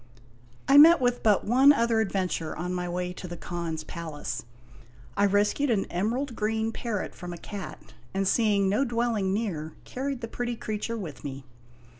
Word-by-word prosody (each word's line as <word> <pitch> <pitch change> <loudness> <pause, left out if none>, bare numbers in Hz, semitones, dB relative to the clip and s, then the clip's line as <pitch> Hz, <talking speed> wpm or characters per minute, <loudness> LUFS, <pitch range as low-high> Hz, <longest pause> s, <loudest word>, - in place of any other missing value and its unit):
I 275 +1 +8
met 330 +3 +9
with 245 -1 +1
but 210 -3 +3
one 260 +6 +6
other 230 -4 +2
adventure 185 -6 -1
on 180 +3 -3
my 180 -1 -2
way 180 0 -3
to 180 - -8
the 175 0 -7
Khan's 165 -2 -4
palace. 150 -9 -5 0.7
I 200 0 +4
rescued 205 +8 +2
an 215 -5 +2
emerald 235 +8 -1
green 220 +1 -1
parrot 225 -3 -4
from 180 -1 -7
a - - -7
cat, 195 - -8 0.2
and 195 0 0
seeing 205 -2 +3
no 205 +8 +2
dwelling 235 -6 0
near 175 -8 -2
carried 265 0 -4
the 230 - -4
pretty 240 +1 -3
creature 215 +1 -4
with 170 -9 -7
me. 135 -1 -6
205 Hz, 170 wpm, -27 LUFS, 180-235 Hz, 0.7 s, met